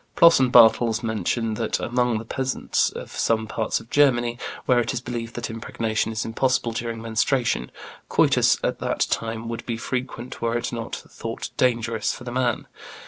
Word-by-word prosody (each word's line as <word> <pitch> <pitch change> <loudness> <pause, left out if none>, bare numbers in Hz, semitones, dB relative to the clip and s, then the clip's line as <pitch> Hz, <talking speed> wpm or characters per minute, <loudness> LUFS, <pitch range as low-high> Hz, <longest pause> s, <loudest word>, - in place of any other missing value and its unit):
Ploss 170 -3 +7
and 130 -2 +3
Bartels 115 -1 +6
mention 110 0 -1
that 115 - -1
among 125 -1 0
the 110 - -6
peasants 130 +2 0
in - - -7
some 110 -1 0
parts 110 0 -1
of 115 - -16
Germany, 120 -4 +3 0.3
where 125 -1 +4
it 120 +1 -1
is - - -1
believed 120 -2 -5
that 120 -1 -4
impregnation 115 -1 -2
is 110 +1 -3
impossible 130 +1 0
during 115 0 -4
menstruation, 115 - 0 0.4
coitus - - +4
at - - -1
that - - -2
time 115 0 -2
would 115 0 -5
be 115 -2 -2
frequent 125 +1 -5
were 115 0 +1
it 120 - -3
not 115 -1 -4
thought - - -7
dangerous 115 -3 +1
for - - -10
the 120 - -6
man. 125 -2 0
115 Hz, 175 wpm, -24 LUFS, 115-125 Hz, 0.4 s, Ploss